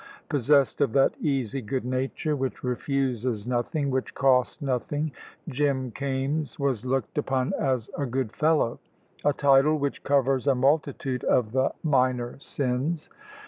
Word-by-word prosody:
Possessed 140 +1 +3
of 135 -6 +2
that 135 - +4
easy 135 -3 -1
good 125 +3 -3
nature 130 +4 -1
which 130 -2 -3
refuses 125 -3 -1
nothing, 130 +4 -1
which 130 0 -2
costs 130 -2 +2
nothing, 145 +3 -2 0.4
Jim 135 -3 0
Kaimes 140 +3 -2
was 135 -6 -1
looked 130 0 -1
upon 130 -2 0
as 130 -5 0
"a 140 - -2
good 125 -2 -2
fellow," 155 -6 +2 0.4
a 145 - +4
title 140 +1 +4
which 140 -1 -3
covers 135 -1 +2
a 135 - +4
multitude 135 -1 0
of 110 -4 +2
the 130 +2 +2
minor 130 -4 +1
sins. 140 +4 -2
135 Hz, 140 wpm, -26 LUFS, 125-145 Hz, 0.4 s, that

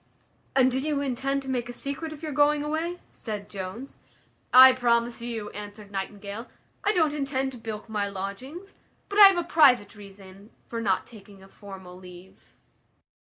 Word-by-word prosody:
"And 260 -1 +4
do 260 - -1
you 290 +1 -1
intend 275 0 -2
to - - -11
make 245 -2 -2
a - - -6
secret 280 +5 -5
of 310 0 -11
your 310 - -4
going 290 +1 +3
away?" 325 +4 -3
said 210 -3 -7
Jones. 200 +7 -7 0.5
"I 260 +1 +10
promise 235 -2 +1
you," 230 -3 -5
answered 205 0 -9
Nightingale, 200 +3 -6 0.4
"I 415 - +3
don't 320 -7 +2
intend 270 -2 -2
to 250 - -11
bilk 220 -1 -7
my 205 -2 -2
lodgings; 250 - -7 0.4
but 405 +1 0
I 405 - +12
have 390 -2 +2
a 345 - 0
private 270 - +4
reason 200 -1 -14 0.2
for 230 -1 -5
not 195 -4 0
taking 200 -3 -15
a - - -15
formal 190 -3 -12
leave." 180 0 -15
240 Hz, 170 wpm, -26 LUFS, 200-280 Hz, 0.5 s, I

